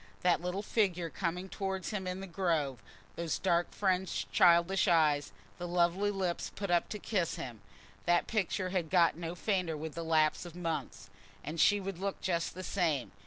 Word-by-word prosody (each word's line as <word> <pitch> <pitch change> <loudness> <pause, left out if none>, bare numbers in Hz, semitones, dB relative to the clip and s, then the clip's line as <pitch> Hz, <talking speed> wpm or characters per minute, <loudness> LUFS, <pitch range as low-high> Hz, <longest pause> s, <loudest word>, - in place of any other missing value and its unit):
That 175 -2 +3
little 180 +3 -3
figure 180 -7 0
coming 180 +1 -2
towards 190 -2 -3
him 195 -3 -3
in 185 +1 -3
the - - -5
Grove, 160 - -1 0.3
those 170 -1 -2
dark 175 -2 +1
fringed 180 - -1
childish 170 - +5
eyes, 150 -5 +3 0.3
the 175 - -4
lovely 175 +3 +2
lips 190 -4 -2
put 200 -2 -3
up 175 -1 +2
to 210 - -4
kiss 190 -5 -1
him—that 120 +9 -3
picture 190 -3 -1
had 180 -4 -1
got 170 -2 +4
no 170 +1 -5
fainter 180 -4 -1
with 155 0 -5
the 170 - -4
lapse 155 -1 +2
of 175 -2 -10
months. 165 - -4 0.3
And 155 +2 -2
she 205 +4 +5
would 195 -2 -5
look 195 0 -3
just 170 -3 -1
the 185 - -6
same. 165 -10 0
175 Hz, 175 wpm, -32 LUFS, 165-190 Hz, 0.3 s, childish